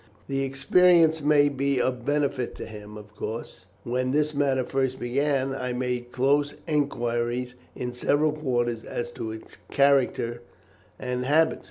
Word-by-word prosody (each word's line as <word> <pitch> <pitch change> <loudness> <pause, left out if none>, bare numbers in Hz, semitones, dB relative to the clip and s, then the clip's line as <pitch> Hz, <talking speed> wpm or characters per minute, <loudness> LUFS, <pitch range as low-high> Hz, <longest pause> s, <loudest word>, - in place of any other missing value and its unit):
"The 135 0 -1
experience 160 +4 +4
may 145 0 +4
be 140 -1 0
of 125 -1 -1
benefit 140 -4 0
to - - -7
him. 105 -1 -10
Of 105 0 -13
course, 110 -5 -6 0.2
when 125 +1 -1
this 150 +2 +1
matter 140 -2 +1
first 130 0 -1
began, 135 +2 0
I 125 -2 -3
made 125 -1 -3
close 145 +3 +1
enquiries 125 -4 -1 0.2
in 125 0 -4
several 145 +5 +2
quarters 120 -6 -1
as 120 0 -4
to 115 - -6
his 110 0 -7 0.3
character 135 -4 +2 0.6
and 125 0 -3
habits. 155 +4 +3
130 Hz, 145 wpm, -26 LUFS, 120-145 Hz, 0.6 s, experience